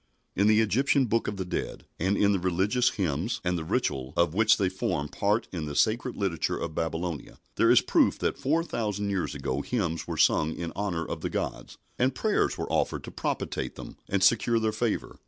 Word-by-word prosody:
In 100 +2 +3
the 110 +1 +5
Egyptian 130 +6 +2
Book 115 0 0
of 105 - -3
the 95 - -3
Dead, 90 - -4
and 95 +4 +1
in 100 0 +4
the 100 - +1
religious 95 +8 +2
hymns 90 - -2
and 90 0 0
the 85 - -3
ritual 65 -3 -1
of 85 -2 +3
which 110 +3 +4
they 100 - +1
formed 75 -5 -2
part 105 +3 0
in 85 -4 -4
the 75 - -5
sacred 120 - +1
literature 95 -5 -1
of 85 - -4
Babylonia, 80 0 -3 0.2
there - - +3
is - - +7
proof - - +2
that - - -2
four 160 +5 +1
thousand 105 - -2
years 95 -2 -2
ago 65 +2 -2
hymns 85 -7 -2
were - - -4
sung 80 +1 +3
in 85 -1 -4
honour 90 -5 -2
of - - -5
the - - -2
gods, - - -4 0.2
and 130 +1 +2
prayers 215 -1 +1
were - - -4
offered - - 0
to - - -8
propitiate - - -3
them - - -9
and 100 -1 +1
secure 115 +2 +4
their 110 -1 +1
favour. 110 +1 -2
100 Hz, 210 wpm, -27 LUFS, 85-110 Hz, 0.2 s, is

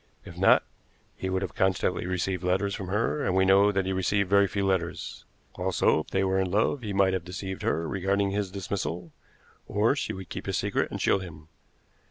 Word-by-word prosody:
If - - -10
not, - - +5 0.5
he 95 - -4
would 95 +1 -1
have 90 - -5
constantly 95 -1 0
received 90 0 -1
letters 95 +2 +1
from 95 -3 -5
her, 115 +9 0
and 95 - 0
we 95 0 +4
know 100 +2 +5
that 95 -1 0
he 95 - -1
received 95 +1 0
very 100 0 +5
few 100 +1 -2
letters. 95 -3 -2 0.3
Also, - - +2
if - - -6
they 95 - 0
were 95 0 +1
in 95 -1 0
love, 110 +8 +1
he 105 -3 -4
might 95 -1 +3
have 95 -3 -1
deceived 95 +1 -6
her 80 0 0
regarding 100 +2 0
his 100 -1 -1
dismissal, 90 -3 -4 0.6
or 110 +6 +2
she - - -2
would 95 0 -8
keep - - -6
his - - 0
secret - - 0
and - - -5
shield 95 - +2
him. 80 -4 -11
95 Hz, 210 wpm, -27 LUFS, 90-100 Hz, 0.6 s, not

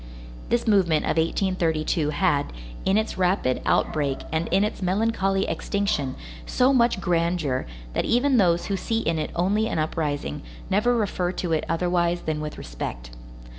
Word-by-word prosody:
This 240 0 +1
movement 180 -7 +3
of - - 0
1832 165 -3 +1
had, 150 -3 +1 0.3
in 195 +2 +3
its 220 -3 -1
rapid 180 -8 +1
outbreak 140 -3 +1
and 160 +1 0
in 195 +3 +2
its 210 - -2
melancholy 195 0 +1
extinction, 200 -10 -1 0.3
so 255 +2 +3
much 235 -5 +3
grandeur, 170 - 0 0.3
that - - 0
even 255 +2 +3
those 175 -5 +3
who 200 - -1
see 225 +3 -1
in 165 -5 0
it 155 - -2
only 205 +5 +1
an - - -2
uprising, 150 -2 -2 0.3
never 215 +5 +3
refer 185 -5 0
to 175 -2 -3
it 155 - 0
otherwise 175 0 +1
than 155 -1 -2
with 150 0 -5
respect. - - -6
175 Hz, 155 wpm, -25 LUFS, 155-200 Hz, 0.3 s, movement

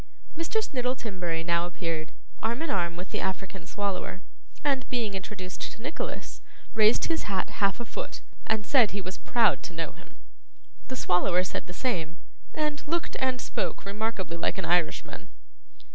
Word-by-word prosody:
Mr. 335 +7 +1
Snittle 250 -2 0
Timberry 180 -8 -2
now 170 0 +2
appeared, 165 -2 -2 0.3
arm 235 +7 0
in 330 - 0
arm 170 -3 +1
with 180 +2 -6
the - - -1
African 190 0 -3
Swallower, 190 -2 -2 0.4
and, 275 -3 +2
being 230 -5 0
introduced 190 -1 -5
to 190 - -4
Nicholas, 285 +5 -4 0.3
raised 220 0 +6
his 325 -9 0
hat 190 -2 0
half 200 +2 +3
a 240 - -3
foot, - - -5 0.3
and 215 -1 +2
said 245 -5 +6
he 200 - -3
was 185 0 -5
proud 230 -3 +4
to 185 - -6
know 165 0 -1
him. - - -16 0.7
The 260 - -3
Swallower 180 -4 +3
said 185 - -3
the - - -6
same, 170 - -1 0.4
and 300 -1 0
looked 335 +2 0
and 260 -1 +2
spoke - - -2
remarkably 200 -4 -1
like 170 - +1
an 190 - -1
Irishman. 170 -2 +1
200 Hz, 165 wpm, -29 LUFS, 180-250 Hz, 0.7 s, raised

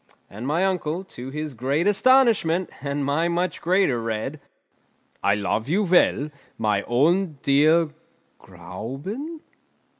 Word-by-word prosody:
And 110 +6 -6
my 165 +6 +1
uncle, 180 -2 -1
to 130 -9 -9
his 150 +1 -5
great 135 +8 -1
astonishment, 205 -6 +3
and 140 0 -2
my 150 +4 +1
much 175 +1 -1
greater, 175 -9 +2
read: 115 +6 -4 0.8
"I 100 0 +3
love 110 +4 -2
you 200 +6 +2
well, 170 -5 +3 0.3
my 105 -2 +1
own 160 +6 +2
dear 155 +4 +4 0.5
Gräuben!" 210 - -7
155 Hz, 120 wpm, -23 LUFS, 135-185 Hz, 0.8 s, dear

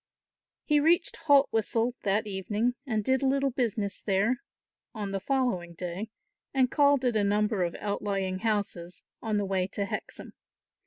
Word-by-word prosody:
He 300 -1 +4
reached 330 +4 +2
Haltwhistle 240 -4 +3
that 205 +2 +1
evening 210 +4 -1
and 220 -4 0
did 260 +3 +2
a 270 - +2
little 275 0 +2
business 220 -5 -2
there 210 +6 +1 0.5
on 205 -2 -4
the 195 - -1
following 200 -9 -1
day 180 +5 -5 0.5
and 255 -2 +3
called 285 -3 +4
at 245 -2 +2
a 210 - +3
number 210 0 +1
of 170 -1 -1
outlying 195 -2 -2
houses 200 -5 -2 0.2
on 215 -2 -1
the 205 - 0
way 190 -1 0
to 200 +1 -3
Hexham. - - -6
215 Hz, 155 wpm, -28 LUFS, 195-255 Hz, 0.5 s, He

